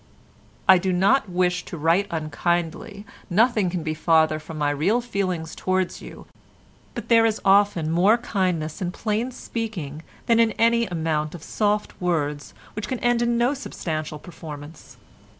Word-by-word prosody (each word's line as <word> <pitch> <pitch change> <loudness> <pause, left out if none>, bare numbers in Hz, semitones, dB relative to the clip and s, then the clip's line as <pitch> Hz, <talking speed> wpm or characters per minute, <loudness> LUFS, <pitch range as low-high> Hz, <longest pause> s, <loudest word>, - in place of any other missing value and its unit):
"I 190 -2 +8
do 190 +1 -1
not 195 +6 +3
wish 180 0 0
to 170 - -7
write 165 +6 +2
unkindly, 170 +6 -2 0.2
nothing 215 0 +3
can 175 -2 -3
be 155 0 -2
farther 160 0 +2
from 155 +1 -9
my 145 -1 +1
real 175 +12 +1
feelings 185 -9 -3
towards 185 -1 -1
you, - - -11 0.7
but - - -6
there 230 -1 +5
is 225 -1 +1
often 195 -5 +3
more 190 +7 +4
kindness 185 -9 -2
in 180 -1 -1
plain 220 +5 -2
speaking 215 - -5 0.2
than 230 -1 +3
in 225 -2 +3
any 235 0 +2
amount 160 -2 -2
of 165 - -10
soft 210 -2 -1
words 150 -5 -2 0.2
which 210 0 -5
can 255 - -2
end 240 -1 +2
in 235 0 +1
no 240 +4 +2
substantial 155 - -5
performance. 155 -2 -11
180 Hz, 155 wpm, -24 LUFS, 160-220 Hz, 0.7 s, I